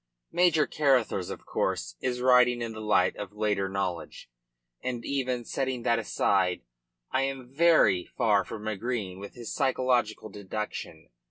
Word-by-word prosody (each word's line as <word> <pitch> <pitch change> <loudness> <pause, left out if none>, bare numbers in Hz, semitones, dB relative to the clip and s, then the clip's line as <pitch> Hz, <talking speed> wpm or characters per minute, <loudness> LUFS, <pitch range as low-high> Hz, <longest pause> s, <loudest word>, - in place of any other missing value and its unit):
Major 170 -3 +4
Carruthers, 130 -10 +1
of - - -7
course, - - -2
is 125 -1 -2
writing 125 -1 +5
in 115 - -4
the 110 0 -7
light 100 -4 +2
of 105 -1 -6
later 105 -2 0
knowledge, 95 -9 -4 0.5
and 120 -2 -4
even, 130 -3 -1
setting 130 -2 -2
that 115 -1 +2
aside, 90 - +1 0.5
I 130 - +2
am 135 -2 -4
very 155 - +4
far 105 -3 +3
from 110 +1 -7
agreeing 110 -3 -3
with 100 0 -9
his 120 -3 -6
psychological 125 -5 +1
deduction. 105 +2 -6
115 Hz, 145 wpm, -28 LUFS, 100-130 Hz, 0.5 s, writing